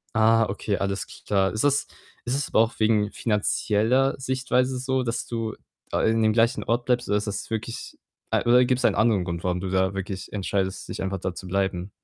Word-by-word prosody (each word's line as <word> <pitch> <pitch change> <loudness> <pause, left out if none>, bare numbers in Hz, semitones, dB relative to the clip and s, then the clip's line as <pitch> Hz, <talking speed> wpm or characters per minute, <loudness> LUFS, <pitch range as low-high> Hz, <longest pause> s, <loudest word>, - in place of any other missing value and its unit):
Ah, 115 +1 +5
okay, 100 0 -2
alles 100 -1 -2 0.2
klar. 95 -2 +2
Ist 110 - -1
das 145 0 +2 0.4
ist 125 +2 0
das 140 - -1
aber - - +2
auch 115 0 -1
wegen 110 -1 +2
finanzieller 110 +4 +1
Sichtweise 130 0 0
so, 130 0 0
dass 115 -1 -2
du 115 -2 -3 0.3
da, - - -1
ah, - - 0
in 115 0 +3
dem 110 0 +3
gleichen 115 +4 +2
Ort 120 +1 0
bleibst? 125 -1 +1
Oder 105 - +3
ist 105 - -3
das 105 - -4
wirklich 115 +1 -5 0.3
a - - +2
oder 125 +1 +5
gibt's 125 0 +1
einen - - +3
anderen 110 -4 +3
Grund, 85 -1 -4
warum 90 0 0
du 95 +1 -4
da 95 0 +1
wirklich 95 -1 -5
entscheidest, 95 -1 -2
dich - - -5
einfach 95 0 -2
da 90 - -3
zu 95 - -8
bleiben? 95 0 -1
110 Hz, 215 wpm, -25 LUFS, 95-120 Hz, 0.4 s, Ah